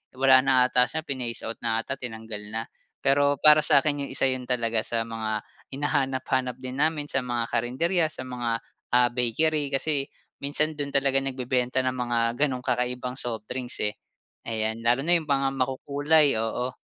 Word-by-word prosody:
wala 130 0 +6
na 135 0 +2
'ata 125 0 +3
siya, 160 +3 -4
phinase 125 -6 -4
out 115 - -5
na 115 -1 -1
'ata, 135 +3 -5
tinanggal 110 -3 -6
na. 115 - -1 0.4
Pero 140 +1 +3
para 150 +2 +7
sa'kin 145 -1 +3
'yong - - -10
isa - - +2
'yon 130 -1 -4
talaga 115 -3 0
sa 115 +1 -2
mga 110 -2 -3 0.3
hinahanap-hanap 135 -3 -1
din 130 +1 -6
namin 150 -1 +1
sa - - +1
mga 120 -2 -2
karinderya, 160 +9 +1
sa 155 -4 -7
mga, 125 -2 -4 0.5
ah, 125 0 +5
bakery 145 +5 +1
kasi 140 0 0 0.3
minsan 150 +2 0
do'n 145 -1 -2
talaga 135 -1 +3
nagbebenta 130 -1 -1
ng 130 - +1
mga 120 -2 -2 0.2
gano'ng 135 -4 0
kakaibang 125 0 -1
soft 115 -5 -4
drinks, 125 -1 -2
eh. 105 0 -1 0.5
Ayan, 110 0 -2
lalo 120 +3 +3
na 175 +3 +4
'yong 160 - -9
mga 135 -1 +2
makukulay, 140 +2 +2
oo. 125 +3 -2
130 Hz, 170 wpm, -26 LUFS, 120-140 Hz, 0.5 s, para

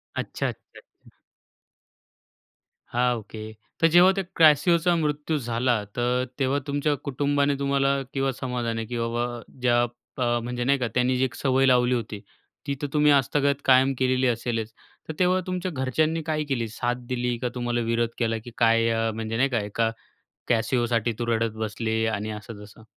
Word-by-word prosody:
अच्छा, - - -3
अच्छा. - - -9 0.2
हं. - - -18 1.8
हां. 125 0 +1
ओके. 110 0 -9 0.3
तर 165 - +6
जेव्हा 175 +3 +6
त्या 195 - -1
क्रॅसिओचा 165 +2 +5
मृत्यू 150 -1 -1
झाला, 120 -3 0
तर 125 +1 0
तेव्हा 135 +1 +1
तुमच्या 145 +1 0
कुटुंबाने 140 +1 +1
तुम्हाला 140 0 +1
किंवा 135 -1 0
समाजाने, 120 -3 -3
की 120 +2 -5
बाबा 120 +1 -2 0.2
ज्या 120 -1 +3 0.4
अ, 120 -2 +1
म्हणजे 120 +1 -3
नाही 140 +3 +3
का, 125 - 0
त्यांनी 125 +1 +2
जी 130 - +1
एक 130 - -6
सवय 135 -1 +2
लावली 125 -1 +4
होती, 110 -3 -4 0.5
ती 140 - 0
तर 145 - -1
तुम्ही 150 -1 +4
आजतागायत 140 0 +2
कायम 130 +1 +5
केलेली 130 0 +2
असेलच. 115 -2 -2 0.4
तर 160 - -4
तेव्हा 185 0 +3
तुमच्या 185 0 -2
घरच्यांनी 155 +4 0
काय 155 -1 -1
केली 120 -4 -1
साथ 120 +3 -2
दिली, 125 -1 -1
का 125 +1 -2
तुम्हाला 120 -1 -1
विरोध 115 0 0
केला? 115 -2 0
की 120 - -10
काय 115 -1 +4
अ, 115 0 0
म्हणजे 110 0 -3
नाही 135 +3 +2
का? 120 -3 0
एका 105 +2 -1 0.6
कॅसिओसाठी 120 -1 +1
तू 120 - -1
रडत 115 -1 0
बसली 110 +1 -1
आणि 110 -1 -2
असं-तसं. 105 0 -10
125 Hz, 165 wpm, -25 LUFS, 115-140 Hz, 1.8 s, तर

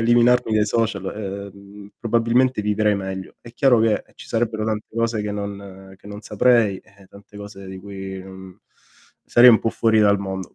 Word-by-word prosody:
eliminarmi 120 0 +3
dai 105 -1 +3
social, 105 -3 -1
ehm, 100 0 -9
probabilmente 115 +1 +1
vivrei 105 0 +1
meglio. 95 -1 -6
È 120 - -13
chiaro 125 -3 +3
che, 110 -1 +1
ci - - -13
sarebbero 110 -2 -1
tante 110 -1 -3
cose 115 -1 0
che 105 0 -4
non 100 -2 -8
che 100 - -18
non 105 0 -8
saprei, 105 -1 +2
eh, 100 -1 -21
tante 100 +1 -16
cose 100 -1 -10
di 95 0 -8
cui 95 -1 -8
mhmm, 95 -1 -13 0.6
sarei 120 +1 +7
un 110 - +5
po' 115 - -1
fuori 110 -1 +1
dal 100 -1 +4
mondo, 95 -2 -6
105 Hz, 175 wpm, -21 LUFS, 100-115 Hz, 0.6 s, sarei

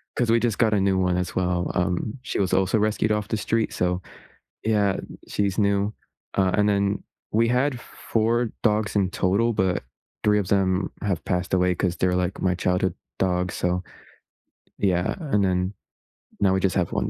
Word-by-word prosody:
'cause 120 -2 +1
we 115 - +5
just 115 -3 0
got 110 -3 +3
a 100 - +3
new 95 -1 +2
one 90 -1 +1
as 90 - -3
well. 90 -1 0
Um, 90 +6 -1
she - - -3
was 95 -2 +1
also 95 +3 +3
rescued 110 0 +1
off 105 -1 0
the 110 - 0
street, 115 +2 0
so 90 0 0 0.6
Yeah, 105 -3 +2 0.3
she's 100 -2 0
new. 100 0 +2 0.4
Uh, 95 -1 +3
and 105 0 +3
then 100 0 +1 0.3
we 115 +2 +3
had 125 +1 +1
4 115 +1 -1
dogs 105 -2 +1
in 95 -2 +3
total, 100 +7 +1
but 95 -6 0 0.4
3 105 0 +4
of 95 - -4
them 95 -1 +1
have 95 -5 -1
passed 90 0 -1
away 90 0 +3
'cause 90 -2 0
they're, 90 0 +1
like, 90 +1 -2
my 90 -1 +2
childhood 90 -1 0 0.2
dogs, 90 -1 0
so, 90 +1 0 1.0
yeah. 90 -3 +1
And 135 - +1
then 90 +1 0 0.7
now, 95 -2 +3
we 95 - +2
just 95 -1 0
have 90 -3 +1
1 - - -1
95 Hz, 185 wpm, -24 LUFS, 90-105 Hz, 1.0 s, we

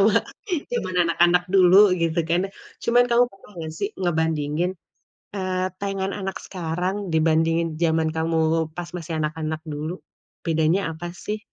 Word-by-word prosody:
sama 205 +1 +5 0.6
zaman 335 - -2
anak-anak 175 +1 +3
dulu 185 -1 +6 0.3
gitu 165 0 +1
kan, 170 +1 +3 0.4
cuman 245 +1 +5
kamu 240 +1 +5
pernah 195 - -18
nggak 160 -1 -5
sih 200 0 -1
ngebandingin, 160 0 0 0.6
eee, 185 -1 -1 0.2
tayangan 195 -1 -2
anak 190 -1 -3
sekarang 180 +1 -2 0.2
dibandingin 165 +1 +2
zaman 160 -1 +2
kamu 165 0 0 0.4
pas 175 -1 -5
masih 165 -1 -6
anak-anak 155 0 -2
dulu? 155 +4 -3 0.5
Bedanya 160 +4 +2
apa 175 +2 -6
sih? 210 +4 -5
170 Hz, 135 wpm, -24 LUFS, 160-185 Hz, 0.6 s, dulu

